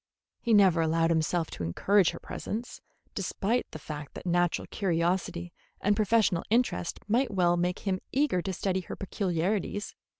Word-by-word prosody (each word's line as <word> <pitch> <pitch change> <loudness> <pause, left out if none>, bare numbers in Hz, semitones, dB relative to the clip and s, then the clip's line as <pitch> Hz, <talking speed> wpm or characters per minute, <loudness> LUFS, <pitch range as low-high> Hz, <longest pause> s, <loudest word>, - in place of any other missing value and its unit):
He 235 - -2
never 185 -5 +5
allowed 165 +1 +2
himself 165 +1 0
to - - -5
encourage 190 - +3
her - - -6
presence, 230 +3 -6 0.3
despite 205 +4 -1
the - - -7
fact 150 -1 -8
that - - -8
natural 175 -1 +1
curiosity 175 -1 -1 0.3
and 205 +1 +2
professional 210 -4 +2
interest 230 -6 +1
might 240 +4 +2
well 175 -3 +3
make 175 +1 0
him 190 -2 0
eager 265 -10 +2
to 190 - -3
study 190 +1 -1
her 180 - -7
peculiarities. 195 +2 -2
185 Hz, 155 wpm, -29 LUFS, 170-205 Hz, 0.3 s, never